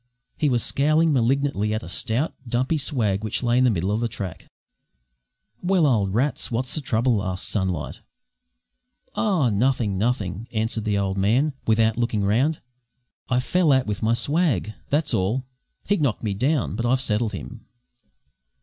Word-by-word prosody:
He 150 - +1
was 120 -3 +2
scowling 155 +3 +2
malignantly 125 -4 +1
at 110 - -4
a - - -8
stout, 125 +8 -1
dumpy 130 +7 0
swag 110 -9 -1
which 110 +4 -2
lay 120 +1 +2
in 130 - +4
the - - +5
middle 95 -2 0
of 105 - 0
the 120 - 0
track. 95 -6 -7 1.1
"Well, 180 -2 +2
old 105 -8 +2
Rats, 130 +2 0
what's 125 +2 -2
the 155 - -2
trouble?" 115 -4 +1
asked 95 -2 -2
Sunlight. 95 -7 -2 1.1
"Oh, 185 - +1
nothing, 110 -2 +1
nothing," 105 -2 -1
answered 110 0 -1
the 105 -1 +1
old 95 -1 -1
man, 125 +10 +2
without 110 0 +3
looking 115 -3 0
round. 125 +10 +1 0.7
"I 125 - +2
fell 165 +5 +2
out 130 -1 +3
with 105 -1 -3
my 115 +1 +2
swag, 145 - 0 0.2
that's 150 +1 +1
all. 110 +8 0 0.4
He 205 - +2
knocked 140 -9 -1
me 105 -3 -1
down, 130 +7 0
but 115 - -2
I've 130 +2 +2
settled 110 -3 0
him." 95 - -8
120 Hz, 165 wpm, -23 LUFS, 105-140 Hz, 1.1 s, the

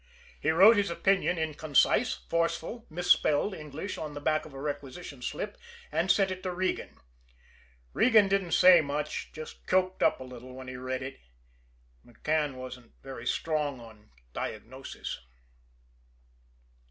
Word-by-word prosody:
He 145 - 0
wrote 195 +8 +7
his 200 -1 +2
opinion 180 +1 +2
in 160 -1 -1
concise, 155 - +3
forceful, 170 +7 -1
misspelled 175 +1 +2
English 155 +4 -6
on 150 -2 -5
the - - -4
back 155 +1 0
of 150 - -15
a - - -7
requisition 145 0 -6
slip, - - -4 0.3
and 160 +4 0
sent 190 0 +4
it 185 0 -5
to 185 - -3
Regan. 185 +1 -2 1.0
Regan 220 -4 +5
didn't 195 -3 0
say 180 -2 +8
much 150 +1 -3
just 155 0 -10
choked 185 0 +1
up - - +3
a - - -6
little 125 0 -10
when 130 0 -9
he 130 - -6
read 130 +1 -3
it. 135 +1 -7 0.8
McCann 150 +4 -1
wasn't 130 -1 -9 0.3
strong 150 -4 -1
on 110 -2 -14 0.2
diagnosis. 130 +5 -6
155 Hz, 140 wpm, -29 LUFS, 135-185 Hz, 1.0 s, say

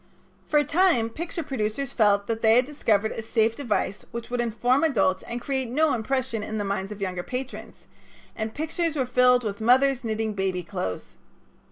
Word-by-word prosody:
For 300 - +2
a 295 - +5
time 290 -8 +2
picture 335 +4 -4
producers 260 0 -3
felt 205 -2 +3
that 225 0 -3
they 220 0 +5
had 250 +1 +4
discovered 220 -7 0
a - - -4
safe 225 0 +1
device 215 -6 -2
which 235 0 -7
would 245 -1 0
inform 240 +4 +1
adults 210 -11 +2
and 240 - -5
create 265 -1 -2
no 305 +5 +2
impression 245 0 -1
in 215 +1 -4
the 205 - -1
minds 195 0 -3
of 205 -1 -8
younger 180 -2 -2
patrons, 255 +7 -7 0.5
and 220 0 -3
pictures 320 +1 -1
were 265 -3 0
filled 250 0 +4
with 205 -1 -4
mothers 260 +3 +4
knitting 220 -1 -2
baby 190 -2 -1
clothes. 95 - -4
235 Hz, 185 wpm, -25 LUFS, 215-265 Hz, 0.5 s, a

